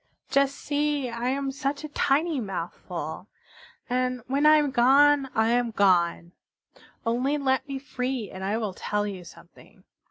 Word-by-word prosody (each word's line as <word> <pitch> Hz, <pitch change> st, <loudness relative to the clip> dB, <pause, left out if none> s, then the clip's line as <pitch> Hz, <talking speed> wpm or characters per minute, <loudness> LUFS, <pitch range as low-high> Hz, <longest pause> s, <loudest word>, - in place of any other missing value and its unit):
Just 275 Hz, 0 st, +2 dB
see, 290 Hz, -2 st, -1 dB
I 235 Hz, +2 st, -2 dB
am 275 Hz, +1 st, -1 dB
such 275 Hz, +2 st, -3 dB
a -, -, -4 dB
tiny 295 Hz, +2 st, +1 dB
mouthful! 180 Hz, -3 st, -6 dB, 0.6 s
And 250 Hz, -1 st, -1 dB
when 280 Hz, +3 st, +2 dB
I 305 Hz, -, +8 dB
am 295 Hz, -2 st, +2 dB
gone 275 Hz, +3 st, +4 dB
I 220 Hz, +1 st, +3 dB
am 240 Hz, 0 st, +2 dB
gone. 175 Hz, -5 st, +2 dB, 0.7 s
Only 250 Hz, +5 st, +1 dB
let 265 Hz, -2 st, 0 dB
me 275 Hz, -1 st, -4 dB
free 255 Hz, -4 st, -4 dB
and 190 Hz, -, -8 dB
I 200 Hz, +3 st, 0 dB
will 215 Hz, -4 st, -3 dB
tell 210 Hz, +2 st, -2 dB
you 195 Hz, -3 st, -6 dB
something. -, -, -17 dB
255 Hz, 155 wpm, -26 LUFS, 210-280 Hz, 0.7 s, I